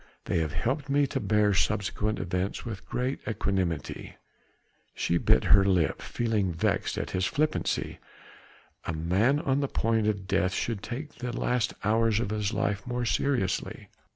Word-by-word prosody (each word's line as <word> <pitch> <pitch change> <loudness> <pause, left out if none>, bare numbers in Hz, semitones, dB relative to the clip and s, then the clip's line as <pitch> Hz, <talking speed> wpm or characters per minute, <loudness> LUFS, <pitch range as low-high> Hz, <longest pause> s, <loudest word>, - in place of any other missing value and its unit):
they 85 - +1
have 80 -3 -1
helped 135 +5 -1
me 140 +1 +3
to - - -2
bear 105 -1 +2
subsequent 105 +2 0
events 90 +2 -2
with 110 -4 -6
greater 130 +2 -2
equanimity." 95 -6 -2 0.8
She 85 - +1
bit - - +4
her 100 0 +6
lip, 90 -6 +2
feeling 110 -6 0
vexed 80 - 0
at - - -3
his 95 0 +1
flippancy. 155 +2 -1 0.9
A - - -2
man 95 - +2
on 140 -3 +1
the 140 - 0
point 115 -4 +1
of 100 -3 -1
death 95 -1 +1
should 115 -4 -2
take 135 +6 -6
the 125 -1 -4
last 125 -3 0
hours 110 0 +3
of 105 -3 -2
his 105 -2 -1
life 105 -1 -1
more 125 0 -1
seriously. 125 -5 -1
105 Hz, 155 wpm, -28 LUFS, 95-125 Hz, 0.9 s, her